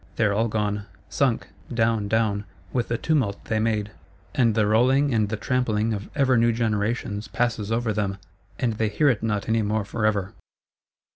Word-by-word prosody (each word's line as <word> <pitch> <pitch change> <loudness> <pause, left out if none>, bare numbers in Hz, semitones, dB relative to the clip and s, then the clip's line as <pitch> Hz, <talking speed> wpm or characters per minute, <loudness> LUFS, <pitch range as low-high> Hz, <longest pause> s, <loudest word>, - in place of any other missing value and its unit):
They 115 - +2
are 100 - +2
all 110 +3 +2
gone; 105 -1 -2 0.2
sunk,—down, 115 -4 0
down, 105 -1 +1 0.3
with 120 -2 0
the 120 - -1
tumult 125 -11 0
they 110 - 0
made; 110 -2 0 0.4
and 115 -4 +3
the 110 -2 +3
rolling 130 +6 +3
and 110 -2 +2
the 110 - -2
trampling 115 -2 0
of 100 0 -5
ever 135 -3 +3
new 120 0 +4
generations 110 -1 -1
passes 115 -1 -1
over 115 -1 0
them, 100 -2 -1 0.4
and 120 -3 0
they 110 0 0
hear 140 +8 +3
it 120 -6 +1
not 105 -3 -1
any 110 0 +2
more 105 0 0
forever. 105 -2 -1
110 Hz, 170 wpm, -24 LUFS, 105-120 Hz, 0.4 s, new